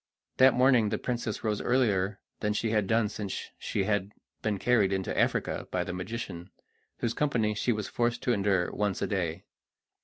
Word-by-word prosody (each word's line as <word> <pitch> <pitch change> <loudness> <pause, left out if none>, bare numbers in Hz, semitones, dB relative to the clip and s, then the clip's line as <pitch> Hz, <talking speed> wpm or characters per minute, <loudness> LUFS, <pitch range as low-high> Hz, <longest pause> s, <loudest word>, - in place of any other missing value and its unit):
That 130 -1 +6
morning 125 -4 +4
the 105 - -1
princess 120 -3 -3
rose 105 -2 0
earlier 105 -6 +1 0.2
than 105 0 0
she 110 +1 -1
had 105 -3 +1
done 110 0 +3
since 100 -1 -5
she 100 - -1
had 100 0 0 0.3
been 105 -2 0
carried 105 -3 +3
into 95 -1 -1
Africa - - 0
by 90 - 0
the 90 - -5
magician, 90 -2 -5 0.5
whose 115 -1 -1
company 115 -8 +1
she 110 +4 0
was 105 -3 -2
forced 120 0 -1
to 125 - +2
endure 95 -4 +1
once 105 -2 -1
a - - 0
day. 90 -6 -2
105 Hz, 180 wpm, -29 LUFS, 95-115 Hz, 0.5 s, That